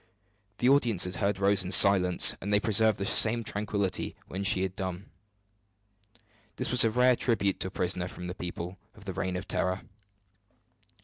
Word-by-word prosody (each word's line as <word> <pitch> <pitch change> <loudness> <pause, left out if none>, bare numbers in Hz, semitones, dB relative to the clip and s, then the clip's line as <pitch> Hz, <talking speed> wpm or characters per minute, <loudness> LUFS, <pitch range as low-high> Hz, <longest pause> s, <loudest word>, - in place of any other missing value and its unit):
The 120 - -1
audience 120 -9 +2
had 90 0 -4
heard 100 -1 -2
Rose 100 0 +1
in 90 - -7
silence, 90 -1 +5
and 100 - -5
they 105 - +2
preserved 110 0 +2
the 100 - -4
same 115 +3 +4
tranquillity 100 -2 -4
when 95 +2 -6
she 95 -2 +1
had 95 -1 -5
done. 95 +1 -7 1.4
This - - -3
was 125 - +6
a 115 - +2
rare 125 +2 +2
tribute 100 -6 -1
to - - -3
a - - -6
prisoner 90 -1 -4
from 90 - -10
the 90 - -6
people 90 0 -8 0.2
of 105 - -17
the 95 - -6
Reign 95 0 -4
of 90 +1 -7
Terror. 95 +1 -3
100 Hz, 180 wpm, -27 LUFS, 90-110 Hz, 1.4 s, was